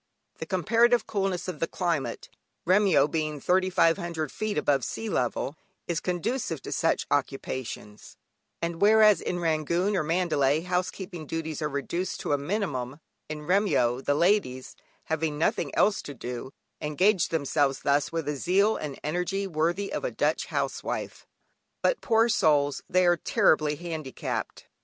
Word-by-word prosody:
The - - -5
comparative 230 +6 +3
coolness 195 -4 -2
of 175 -5 -5
the 165 - 0
climate 170 -6 -2 0.4
(Remyo 180 -6 +4
being 155 -1 -2
3,500 170 -3 +1
feet 215 -1 -3
above 140 -3 +2
sea 225 - -4
level) 135 - -1 0.3
is 170 - 0
conducive 180 - -2
to - - -7
such - - +1
occupations, 130 -6 -3 0.5
and 170 +1 -3
whereas 215 0 +6
in 180 - -2
Rangoon, 170 +4 0
or 180 - +2
Mandalay, 155 -3 +1
housekeeping 180 -1 -3
duties 160 -1 -4
are 150 - -1
reduced 170 +6 -3
to - - -1
a - - +3
minimum, 145 - -3 0.3
in 150 -1 -6
Remyo, 150 - +2
the 145 - +1
ladies, 170 -8 +1 0.3
having 160 -1 -2
nothing 170 +8 0
else 210 0 +3
to 145 - -8
do, 125 +2 -6 0.3
engage 180 +6 +2
themselves 140 -3 0
thus 140 0 +1
with 165 -2 -3
a 150 - -1
zeal 195 +8 +2
and 145 -3 -6
energy 180 +5 -1
worthy 175 +3 -1
of - - -3
a - - 0
Dutch - - 0
housewife. - - -3 0.6
But, - - +2
poor 225 -1 +3
souls, 145 - +2
they 185 0 +3
are 175 0 +4
terribly 155 -2 +2
handicapped! 160 -4 -5
165 Hz, 145 wpm, -27 LUFS, 145-190 Hz, 0.6 s, whereas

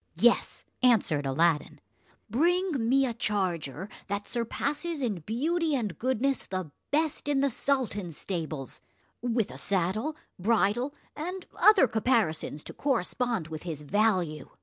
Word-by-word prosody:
"Yes," - - +3 0.2
answered 190 - +3
Aladdin, 150 +2 +1 0.5
"bring 315 - +1
me 270 +1 +4
a 240 - -1
charger 185 - -1 0.2
that 200 0 -3
surpasses 285 +7 -1
in 225 -9 -1
beauty 305 - 0
and 215 - -2
goodness 260 +2 0
the 185 -5 -4 0.2
best 305 0 0
in 285 -2 +2
the 280 -1 +2
sultan's 215 - -1
stables; 155 -7 -4 0.4
with 230 -3 0
a - - -7
saddle, 200 - 0 0.2
bridle, 230 - +2 0.2
and 360 +4 -5
other 420 -10 +6
caparisons 215 - +1
to - - -8
correspond 240 - -1
with 155 -1 -6
his 160 -4 -5
value. 185 -3 +1
225 Hz, 125 wpm, -29 LUFS, 175-275 Hz, 0.5 s, other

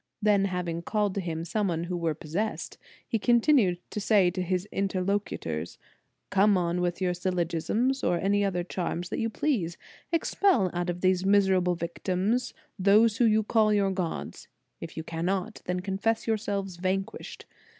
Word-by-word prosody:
Then 205 -2 +3
havino 180 -3 -3
o - - -7
called 205 +2 0
to 200 - -2
him 165 -2 -4
some 175 -3 -1
who 180 +1 -3
were 165 -3 -1
possessed, 175 +9 -4 0.3
he 225 - 0
continued 235 - +4
to 210 - -3
say 200 -4 +4
to 185 +1 -3
his 180 +2 -1
interlocutors: 190 - -2 0.5
"Come 200 +1 +4
on 175 0 0
with 175 0 -1
your 180 -1 +1
syllogisms, 180 +8 -1
or 175 - +2
any 205 +3 +1
other 180 -3 0
charm 175 -1 -3
that - - -2
you 225 - 0
please. 215 - -1 0.3
Expel 330 - +2
out 175 0 -2
of 175 0 -3
these 185 -1 +2
misera 195 -1 +4
ble 180 0 +1
victims 190 +8 -1 0.2
those 210 +3 +5
whom 230 -3 +4
you 215 0 +3
call 215 0 +3
your 200 -2 +2
gods. 185 -3 -4 0.3
If 165 0 -8
you 160 - -3
cannot, 180 +6 -3
then 180 0 -2
confess 200 +4 -1
yourselves 200 -4 -2
van 185 +2 0
quished. - - -10
190 Hz, 170 wpm, -28 LUFS, 175-210 Hz, 0.5 s, those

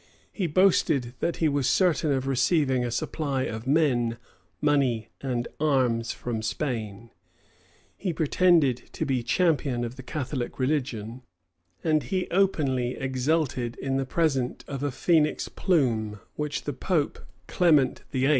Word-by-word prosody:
He 190 -5 -1
boasted 155 -7 +2
that 170 - 0
he 160 - +2
was 140 -3 +1
certain 165 -4 +2
of 135 -1 0
receiving 135 -1 +2
a 120 - -1
supply 135 +3 -2
of 110 +1 -5
men, 125 -6 +2 0.4
money, 135 -7 +1
and 125 -3 -2
arms 130 -6 +1
from 115 -3 -4
Spain: 115 -3 -4 0.8
he 190 - -2
pretended 160 -4 +3 0.2
to - - -2
be 130 -3 0
champion 140 -2 +1
of 120 +2 -7
the - - -7
Catholic 130 -2 -4
religion: 130 -4 -2 0.6
and 155 -2 +2
he 185 +2 -2
openly 140 -10 +1
exulted 130 -2 -1
in 135 0 -2
the 135 - -1
present 135 -5 0
of 135 -2 -5
a 145 - 0
phoenix 155 +3 +1
plume, 115 - 0 0.2
which 150 -1 -3
the 145 - -3
pope, 155 0 -1 0.3
Clement 155 -7 +3
VIII. 130 +1 +1
135 Hz, 135 wpm, -26 LUFS, 125-155 Hz, 0.8 s, pretended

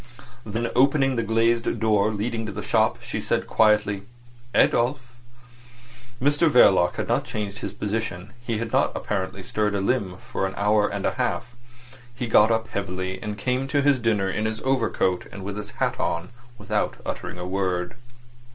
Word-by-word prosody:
Then 115 +2 -3
opening 135 +1 +4
the 115 - +1
glazed 115 +1 +1
door 105 -2 +3
leading 110 +1 -2
to - - -4
the 105 +2 -6
shop, 110 -1 +1
she - - -4
said - - 0
quietly 105 -2 +3 0.5
"Adolf!" 125 +4 +3 1.2
Mr 145 +5 +3
Verloc 95 -10 +5
had - - -3
not - - +1
changed 105 -2 -5
his - - -4
position; 105 -2 -4
he 120 -2 -2
had 115 0 -4
not - - +3
apparently 95 -1 -3
stirred 105 +1 -1
a - - +1
limb 100 -3 0
for 95 - -3
an 95 - -7
hour 105 +1 +3
and 100 -1 -3
a - - +2
half. 120 -1 -2 0.6
He 120 - -3
got 110 -1 +5
up 115 0 0
heavily, 95 -1 -4
and 105 -2 -4
came 130 +3 -1
to 140 0 +1
his 140 -2 +4
dinner 110 -4 +1
in 105 +3 -1
his 110 0 -2
overcoat 115 -8 0
and 100 -1 -8
with 100 +1 -5
his 105 0 -6
hat - - -2
on, 85 +2 -1 0.3
without - - -1
uttering - - -5
a 90 - -5
word. 90 -1 -1
110 Hz, 175 wpm, -24 LUFS, 100-115 Hz, 1.2 s, Verloc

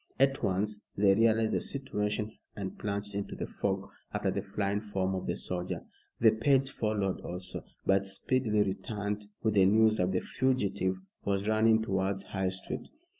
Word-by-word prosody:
At 135 0 +3
once 105 +2 0 0.2
they 100 -1 +6
realized 110 +1 +3
the - - +1
situation, 105 -5 -2 0.2
and 100 -2 -5
plunged 100 0 -3
into 100 0 -3
the - - -3
fog - - -2 0.2
after - - 0
the - - -1
flying 100 0 -1
form 95 -3 -1
of 95 - -3
the - - 0
soldier. 90 0 -3 0.3
The 110 -1 +7
page 135 +5 +2
followed 105 -5 -1
also, 90 +1 -5 0.2
but 95 0 +3
speedily 105 +1 +2
returned 105 +1 -3 0.2
with 110 -1 +2
the 100 -2 +6
news 110 +1 +5
that 90 +1 +1
the 90 - +1
fugitive 100 -8 0 0.3
was 100 0 0
running 110 0 +4
towards 95 -2 0
High 95 -1 -1
Street. 95 +1 -5
105 Hz, 165 wpm, -31 LUFS, 95-110 Hz, 0.3 s, The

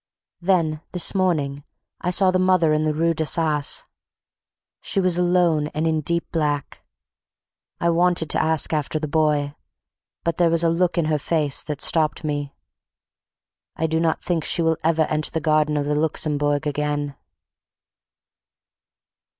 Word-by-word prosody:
Then 165 -4 +1
this 180 -2 +2
morning 150 -7 0 0.4
I 180 - -2
saw 185 +1 +4
the 185 - +1
mother 185 -4 +3
in 155 - +1
the 155 - +1
rue 165 +2 +1
D'Assas. 155 -1 +1 1.0
She 195 - -2
was 180 -2 +2
alone 175 -4 +2
and 155 +2 -1
in 160 -1 +1
deep 170 +3 -2
black. 150 -3 -2 1.0
I 170 - +2
wanted 175 -1 +2
to - - +1
ask 160 0 +1
after 150 0 -1
the 155 0 -3
boy, 150 -2 +1 0.7
but 170 - -1
there 175 -1 +3
was 165 0 +2
a 165 - +3
look 175 +2 0
in 170 - +2
her 155 -1 0
face 150 -2 -1
that 150 -2 -5
stopped 155 -1 +2
me. 145 -2 -3 1.2
I 160 - -1
do 160 0 0
not 165 -1 0
think 170 -3 -1
she 170 - 0
will 160 -1 +1
ever 160 0 +2
enter 155 0 -1
the 160 - -2
garden 155 0 +1
of 145 - -1
the 150 - -1
Luxembourg 150 -1 0
again. 145 -1 -2
160 Hz, 155 wpm, -22 LUFS, 150-170 Hz, 1.2 s, saw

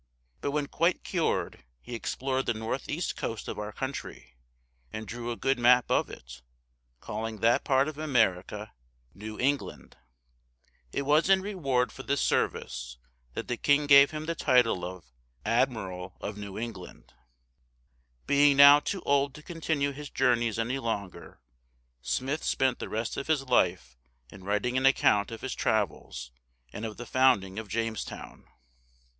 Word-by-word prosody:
But - - -2
when 145 0 -1
quite 170 +5 0
cured 170 - -1 0.2
he 120 - -10
explored 130 +3 -2
the 120 - +1
northeast 130 +9 -3
coast 115 -2 -5
of - - -5
our 105 0 -5
country, 130 - -6 0.6
and 110 0 -6
drew 120 +4 -5
a 120 - -2
good 135 +1 0
map 125 +1 +5
of - - +2
it, - - -11 0.6
calling 110 - -5
that 115 +1 +3
part 135 0 +3
of 155 -1 -6
America 105 -7 0 0.4
New 105 +3 -8
England. 140 +2 -2 0.9
It - - -2
was 150 +6 +3
in 190 -1 +5
reward 140 -11 0
for - - -9
this 140 +1 -1
service - - -1 0.4
that - - -4
the 120 - -2
king 145 +3 +3
gave 140 -1 +8
him 155 0 -6
the 165 - -1
title 125 - +2
of 90 0 -7 0.4
"Admiral 105 -6 -1
of 105 - -5
New 100 -2 -7
England." 110 -6 -8 1.1
Being 145 0 +4
now 140 +1 +10
too 190 +5 -4
old 140 -1 +1
to 155 - -12
continue 160 -4 -1
his 145 +1 -8
journeys 120 -4 +1
any 120 +4 -1
longer, 100 -8 -5 0.6
Smith 135 - -2
spent 130 -2 +1
the - - -5
rest 110 +1 -3
of 140 - -4
his 155 -3 +1
life 90 - +1 0.4
in 95 -2 -13
writing 105 +5 0
an 130 +1 +4
account 105 -6 +3
of 115 - -8
his 130 - -3
travels 65 - -2 0.4
and 110 +2 -4
of 110 - -9
the 120 - -7
founding 110 -7 +2
of 110 - -7
Jamestown. 115 +1 -5
125 Hz, 155 wpm, -28 LUFS, 105-140 Hz, 1.1 s, now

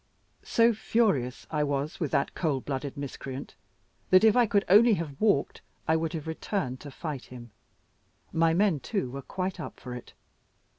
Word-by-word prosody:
So 230 0 +3
furious 200 - 0
I 150 -2 +1
was 145 +1 -2
with 155 -5 -1
that 140 - 0
cold 145 -7 -1
blooded 140 0 -4
miscreant, 135 -1 -6 0.6
that 185 +1 +6
if 220 -2 +6
I 245 -2 +5
could 200 -2 +2
only 215 +4 +7
have 160 -6 -5
walked, 205 -10 +2 0.3
I 160 - +4
would 160 +1 -1
have 155 -3 -4
returned 160 -5 -3
to 145 - -9
fight 145 -1 -6
him. 120 -2 -11 0.8
My 165 0 +3
men, 190 -5 +3
too, 190 - -2
were 140 +1 -6
quite 185 +5 -4
up 155 - -7
for 125 - -7
it. 125 - -9
160 Hz, 170 wpm, -28 LUFS, 135-195 Hz, 0.8 s, only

